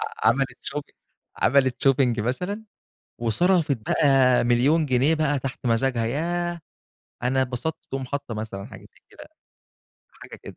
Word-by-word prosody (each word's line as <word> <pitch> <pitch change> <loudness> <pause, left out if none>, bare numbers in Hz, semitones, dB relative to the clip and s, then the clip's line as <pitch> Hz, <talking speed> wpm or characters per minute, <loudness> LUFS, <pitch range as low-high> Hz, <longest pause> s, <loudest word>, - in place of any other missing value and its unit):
ع - - -1
عملِت 130 +1 0
Shopping 145 +1 -5 0.4
عملِت 135 0 +3
Shopping 125 -3 +2
مثلًا 180 - -3 0.5
وصرفت 145 - +2
بقى 130 +2 +3
1.000.000 130 +7 +3
جنيه 135 +3 +2
بقى 145 -3 0
تحت 130 0 -6
مزاجها، 115 0 +1
ياه 175 +6 -2 0.6
أنا 130 +2 +2
اتبسطت، 130 +5 -2
تقوم 135 -1 -4
حاطّة 140 -2 -5
مثلًا 105 -2 -6
حاجة 110 -6 -12
زي 105 - -20
كده، - - -13 1.0
حاجة - - -11
كده. - - -10
135 Hz, 135 wpm, -24 LUFS, 120-150 Hz, 1.0 s, عملِت